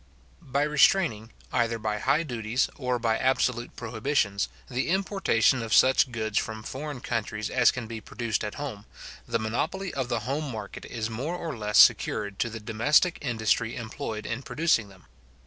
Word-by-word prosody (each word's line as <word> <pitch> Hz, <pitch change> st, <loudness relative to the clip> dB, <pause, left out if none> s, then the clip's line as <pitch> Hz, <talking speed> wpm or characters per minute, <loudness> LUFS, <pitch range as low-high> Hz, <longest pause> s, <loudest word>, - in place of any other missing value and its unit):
By 140 Hz, +2 st, 0 dB
restraining, 150 Hz, -, +3 dB, 0.2 s
either 115 Hz, -2 st, +1 dB
by 110 Hz, -1 st, -2 dB
high 140 Hz, +7 st, +2 dB
duties, 120 Hz, -2 st, -1 dB
or 125 Hz, -2 st, -1 dB
by 115 Hz, -2 st, 0 dB
absolute 125 Hz, -2 st, 0 dB
prohibitions, 110 Hz, -3 st, -1 dB, 0.2 s
the 130 Hz, +3 st, -2 dB
importation 190 Hz, -, +2 dB
of 115 Hz, -1 st, +1 dB
such 130 Hz, -1 st, +5 dB
goods 110 Hz, -2 st, 0 dB
from 110 Hz, -1 st, -5 dB
foreign 140 Hz, +1 st, -6 dB
countries 110 Hz, -3 st, -3 dB
as 125 Hz, -2 st, +5 dB
can 125 Hz, -2 st, -3 dB
be 110 Hz, 0 st, -7 dB
produced 115 Hz, +1 st, -3 dB
at 105 Hz, -, -4 dB
home, 125 Hz, -8 st, -6 dB, 0.4 s
the -, -, +1 dB
monopoly 120 Hz, -, -2 dB
of 130 Hz, -3 st, -2 dB
the 110 Hz, -, -1 dB
home 140 Hz, +6 st, -2 dB
market 105 Hz, -3 st, -7 dB
is 115 Hz, -1 st, -4 dB
more 140 Hz, +10 st, -3 dB
or 165 Hz, -5 st, -4 dB
less 105 Hz, -2 st, -1 dB
secured 100 Hz, -2 st, +4 dB
to 120 Hz, -, +1 dB
the 115 Hz, 0 st, -7 dB
domestic 120 Hz, +11 st, +2 dB
industry 115 Hz, -3 st, 0 dB
employed 110 Hz, -1 st, -5 dB
in 115 Hz, +3 st, -3 dB
producing 140 Hz, -8 st, +1 dB
them. 95 Hz, -2 st, -18 dB
120 Hz, 165 wpm, -27 LUFS, 110-140 Hz, 0.4 s, such